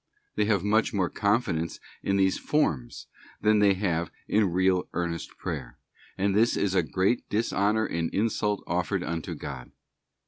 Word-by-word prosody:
They 105 Hz, -, +1 dB
have 105 Hz, -4 st, +1 dB
much 110 Hz, +2 st, +2 dB
more 95 Hz, -4 st, +1 dB
confidence 100 Hz, -6 st, 0 dB, 0.2 s
in 100 Hz, -, +1 dB
these 95 Hz, -1 st, +2 dB
forms 75 Hz, -, -1 dB, 0.3 s
than 105 Hz, 0 st, +3 dB
they 100 Hz, -2 st, +5 dB
have 85 Hz, -4 st, -1 dB, 0.2 s
in 105 Hz, -4 st, +2 dB
real 95 Hz, +1 st, +2 dB
earnest 85 Hz, -1 st, -3 dB
prayer; -, -, -5 dB, 0.4 s
and 100 Hz, +1 st, +1 dB
this 115 Hz, +3 st, +3 dB
is 100 Hz, -2 st, +1 dB
a 95 Hz, -, +4 dB
great 95 Hz, +8 st, 0 dB
dishonour 110 Hz, 0 st, +1 dB
and 85 Hz, -3 st, -2 dB
insult 105 Hz, -1 st, 0 dB
offered 90 Hz, +2 st, -1 dB
unto 85 Hz, -2 st, -4 dB
God. 65 Hz, -3 st, -7 dB
95 Hz, 150 wpm, -27 LUFS, 85-105 Hz, 0.4 s, they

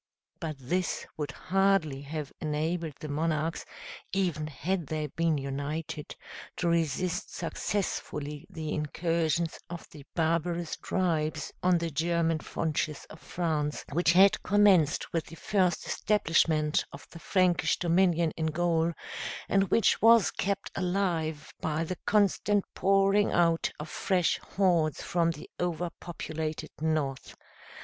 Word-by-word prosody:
But 160 Hz, -3 st, -4 dB
this 175 Hz, +8 st, -2 dB
would 150 Hz, -2 st, -3 dB
hardly 195 Hz, -7 st, +1 dB
have 150 Hz, 0 st, -5 dB
enabled 155 Hz, +1 st, -2 dB
the 155 Hz, -, -6 dB
monarchs, 155 Hz, +2 st, -1 dB, 0.5 s
even 175 Hz, -6 st, 0 dB
had 170 Hz, +3 st, -2 dB
they 155 Hz, -1 st, -2 dB
been 160 Hz, +2 st, 0 dB
united, 145 Hz, +3 st, -4 dB, 0.4 s
to 175 Hz, -, 0 dB
resist 170 Hz, +4 st, 0 dB
successfully 150 Hz, -7 st, -3 dB
the 155 Hz, -2 st, -4 dB
incursions 165 Hz, +1 st, 0 dB
of 170 Hz, -1 st, -7 dB
the 150 Hz, -2 st, -11 dB
barbarous 170 Hz, 0 st, 0 dB
tribes 155 Hz, -5 st, -1 dB
on 180 Hz, -1 st, +4 dB
the 170 Hz, -1 st, -2 dB
German 165 Hz, +1 st, +1 dB
frontiers 155 Hz, -1 st, -2 dB
of 160 Hz, -, -11 dB
France, 155 Hz, -4 st, -2 dB
which 170 Hz, +2 st, +3 dB
had 190 Hz, +2 st, +6 dB
commenced 190 Hz, -6 st, +3 dB
with 165 Hz, -2 st, -1 dB
the 165 Hz, -, -10 dB
first 185 Hz, -1 st, +1 dB
establishment 160 Hz, -6 st, +2 dB
of 140 Hz, -, -11 dB
the 170 Hz, -, -10 dB
Frankish 180 Hz, 0 st, +2 dB
dominion 170 Hz, -2 st, +3 dB
in 160 Hz, -1 st, -1 dB
Gaul; 165 Hz, +1 st, +1 dB, 0.5 s
and 195 Hz, 0 st, +3 dB
which 230 Hz, -, +3 dB
was 230 Hz, -2 st, +6 dB
kept 200 Hz, +1 st, -2 dB
alive 175 Hz, -5 st, -1 dB
by 160 Hz, +1 st, 0 dB
the 180 Hz, +2 st, -5 dB
constant 205 Hz, -1 st, +3 dB
pouring 195 Hz, +1 st, +3 dB
out 165 Hz, -1 st, +3 dB
of 150 Hz, -, -5 dB
fresh 180 Hz, +1 st, +1 dB
hordes 175 Hz, -6 st, +1 dB
from 170 Hz, -1 st, +1 dB
the 160 Hz, -3 st, -6 dB
overpopulated 165 Hz, -2 st, -4 dB
North. 155 Hz, -4 st, -1 dB
165 Hz, 125 wpm, -29 LUFS, 155-180 Hz, 0.5 s, had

